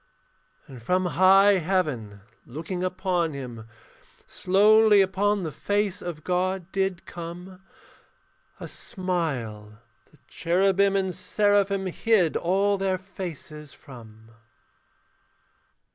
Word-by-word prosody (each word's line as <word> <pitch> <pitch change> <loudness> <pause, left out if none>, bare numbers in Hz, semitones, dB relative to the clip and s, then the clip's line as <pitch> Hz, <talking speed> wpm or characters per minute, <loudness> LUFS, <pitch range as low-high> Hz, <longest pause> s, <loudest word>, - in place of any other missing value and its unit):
And 130 -3 -12
from 180 +10 0
high 190 +2 +5
heaven 150 - -2 0.3
looking 165 +7 -5
upon 180 -3 -1
him, 120 -5 -8 0.6
Slowly 210 +2 +4
upon 195 +1 +1
the 160 - -4
face 205 +5 -1
of 165 -4 -7
God 185 0 -2
did 190 -2 -2
come 175 +2 -9 1.0
A - - -7
smile 130 - -4 0.3
the - - -23
cherubim 195 +3 +1
and 190 -2 0
seraphim 200 +1 +1
Hid 185 -2 +1
all 195 +3 +1
their 190 -1 0
faces 165 -6 -9
from. 110 -4 -15
185 Hz, 100 wpm, -25 LUFS, 155-195 Hz, 1.0 s, high